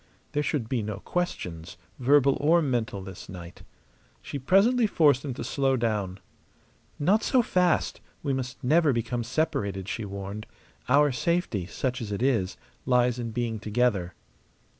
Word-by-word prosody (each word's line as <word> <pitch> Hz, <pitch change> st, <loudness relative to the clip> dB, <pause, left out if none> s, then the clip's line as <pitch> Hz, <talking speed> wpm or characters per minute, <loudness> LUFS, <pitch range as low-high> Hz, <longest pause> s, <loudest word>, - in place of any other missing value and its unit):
There 145 Hz, -, 0 dB
should 145 Hz, -6 st, -1 dB
be 120 Hz, -1 st, -1 dB
no 105 Hz, -1 st, -4 dB
questions, 90 Hz, -, -4 dB, 0.2 s
verbal 140 Hz, +1 st, +4 dB
or 160 Hz, +4 st, +5 dB
mental, 115 Hz, -7 st, -1 dB
this 95 Hz, -1 st, -10 dB
night. 90 Hz, -2 st, -10 dB, 0.6 s
She 140 Hz, -, -5 dB
presently 215 Hz, -, +4 dB
forced 145 Hz, -9 st, +3 dB
him 135 Hz, -4 st, -4 dB
to -, -, -5 dB
slow 135 Hz, -2 st, +1 dB
down. 105 Hz, -5 st, -1 dB, 0.8 s
"Not 190 Hz, +9 st, +3 dB
so 255 Hz, -2 st, +3 dB
fast! 180 Hz, -5 st, +1 dB, 0.2 s
We 140 Hz, -2 st, 0 dB
must 130 Hz, 0 st, -4 dB
never 150 Hz, +2 st, +4 dB
become 120 Hz, +1 st, -2 dB
separated," 100 Hz, -, -1 dB
she 110 Hz, -, -3 dB
warned. 100 Hz, +1 st, -6 dB, 0.4 s
"Our 145 Hz, +2 st, +5 dB
safety 125 Hz, -, -1 dB
such 125 Hz, +4 st, -2 dB
as 105 Hz, -3 st, -5 dB
it 100 Hz, +4 st, -2 dB
is 115 Hz, -9 st, +1 dB, 0.3 s
lies 125 Hz, -1 st, +3 dB
in 115 Hz, -1 st, -3 dB
being 115 Hz, -1 st, -2 dB
together." 105 Hz, -5 st, 0 dB
125 Hz, 150 wpm, -27 LUFS, 105-145 Hz, 0.8 s, or